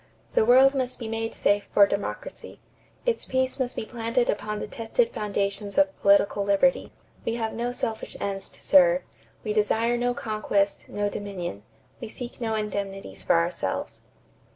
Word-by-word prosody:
"The - - +4
world 260 +3 +7
must 255 -2 -1
be 230 - -6
made 225 0 -3
safe 205 0 +1
for 200 - +7
democracy. 200 - -5 0.5
Its 480 -2 0
peace 260 +1 -1
must 255 -1 -1
be - - -3
planted 235 +1 0
upon 210 +1 -4
the - - -4
tested 230 - -1
foundations 205 -1 -2
of 290 0 +3
political 200 0 +4
liberty. 200 +7 +2 0.3
We 230 - -1
have 225 -2 -2
no 240 +2 -2
selfish 225 -2 -3
ends 195 -1 -3
to - - -14
serve. 180 -1 +5 0.4
We 210 - -1
desire 225 +3 +2
no 245 0 0
conquest, 210 -3 -1
no 205 0 -1
dominion. 195 - -5 0.4
We 230 - -7
seek 245 +2 -8
no 225 -1 -1
indemnities 195 - -4
for - - +2
ourselves." 85 0 -1
220 Hz, 160 wpm, -26 LUFS, 200-245 Hz, 0.5 s, world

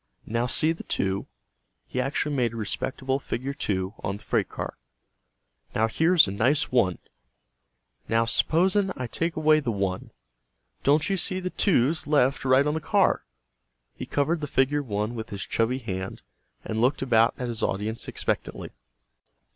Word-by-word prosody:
"Now 115 +2 -1
see 155 +6 +3
the 165 - -5
2?" 95 0 -2 0.6
He 125 - -2
actually 145 +2 -1
made 120 -4 +1
a - - -7
respectable 130 +5 -2
figure 135 +1 -4
2 95 -8 -2
on 100 +1 -2
the - - -18
freight - - 0
car. - - -5 1.0
"Now, 110 +1 +3
here's 160 - +4
a - - -3
nice 130 +9 +2
1. 100 -9 +2 1.1
Now, 115 0 +3
s'posen 190 - +2
I 130 - -4
take 165 +8 -2
away 155 0 +4
the 130 -6 -2
1, 95 -3 -2 0.7
don't 145 +2 +3
you 195 - 0
see 185 +1 -1
the 185 0 -4
2's 155 - +2
left 140 -3 +2
right 130 +1 +4
on 150 - +1
the 160 - -2
car?" - - +2 0.7
He - - -7
covered 155 +3 0
the 150 - -3
figure 140 +2 +2
1 105 -3 -2
with 110 -1 -6
his 100 -1 -5
chubby 115 +3 0
hand 95 -6 -5 0.4
and 110 0 -2
looked 130 +3 +2
about 115 -3 +3
at 125 - -3
his 115 -2 -3
audience 105 +4 -2
expectantly. - - -3
130 Hz, 165 wpm, -26 LUFS, 110-150 Hz, 1.1 s, here's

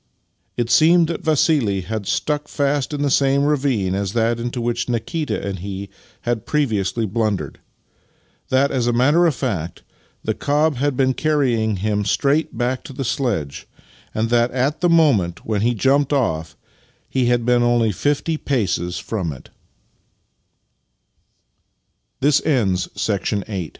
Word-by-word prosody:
It 120 0 -1
seemed 165 +1 +5
that 170 - -3
Vassili 145 - +2
had 100 +1 -5
stuck 150 0 -1
fast 140 -1 -1
in 145 -1 -2
the 140 - +1
same 140 +1 +3
ravine 135 -10 +1
as 100 0 -2
that 115 0 +1
into 120 +1 -3
which 120 +1 -2
Nikita 130 - -2
and 95 -2 -4
he 100 +1 -6 0.3
had 120 -3 -2
previously 115 -6 0
blundered 105 -1 -2 0.5
— - - -40
that, 135 +2 +2
as 125 -2 0
a 120 - +2
matter 145 +9 +4
of 155 - 0
fact, 90 - -3 0.4
the - - 0
cob 150 0 +1
had 140 0 0
been 130 -1 +2
carrying 125 -8 +1
him 105 +2 -1
straight 140 +9 0
back 125 +1 -1
to - - -9
the 135 +1 -4
sledge, 115 - -2 0.4
and 115 +1 -2
that, 120 0 +3
at 130 +6 -1
the 175 - +3
moment 135 - +2
when 105 -2 -1
he 120 +2 +1
jumped 140 +5 +2
off, 80 - -1 0.5
he 125 -2 0
125 Hz, 125 wpm, -20 LUFS, 110-145 Hz, 0.5 s, seemed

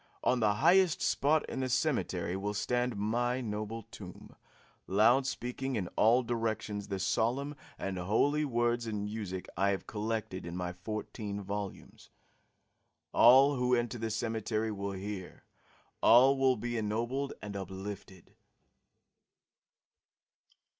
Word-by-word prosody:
On 125 - +2
the 105 -2 +2
highest 175 - +4
spot 150 +2 +2
in - - -4
the 130 -1 -1
cemetery 120 - 0
will 100 +2 -3
stand 125 +3 0
my 120 +4 0
noble 110 -1 -4
tomb, 95 -6 -11 0.5
loud 120 +7 +4
speaking 130 +1 -3
in 95 -6 -2
all 120 +4 +4
directions 110 -3 -2
the 100 - -3
solemn 120 +9 0 0.2
and 95 -1 -4
holy 130 +11 +2
words 120 -3 0
and 105 -2 -3
music 105 -3 -5
I 100 +2 +2
have 95 -2 -2
collected 110 -3 -3
in 85 +1 -6
my 90 0 -3
fourteen 105 +2 -5
volumes. 100 0 -6 1.0
All 135 +4 +7
who 125 0 +2
enter 120 0 -2
the 115 0 -2
cemetery 110 0 -2
will 100 -1 -4
hear; 95 -1 -7 0.6
all 130 +4 +7
will 135 -1 +3
be 120 +1 -3
ennobled 120 +6 -2
and 105 -1 -7
uplifted." 95 -1 -8
110 Hz, 125 wpm, -31 LUFS, 100-125 Hz, 1.0 s, All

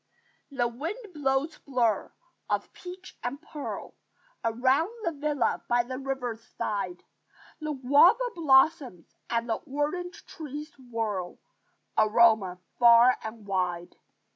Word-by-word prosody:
The 255 -4 0
wind 355 - -6
blows 290 +1 0
blurs 245 -5 0 0.4
of - - -1
peach 365 +1 -10
and 245 +3 -3
pearl 300 -2 -7 0.5
Around 255 - +2
the 335 - 0
villa 290 -5 -1
by 240 0 +3
the 255 +1 -6
river's 260 -4 -3 0.2
side; 190 -4 -3 0.6
The 305 -1 -3
guava 295 - +5
blossoms 270 - +3 0.2
and 230 0 0
the 225 -2 0
orange 305 +5 -3
trees 300 0 -7
whirl 225 -7 -3 0.6
Aroma 215 -4 +4 0.2
far 235 +1 +7
and 220 -1 -8
wide. 180 -3 -2
260 Hz, 115 wpm, -28 LUFS, 225-300 Hz, 0.6 s, far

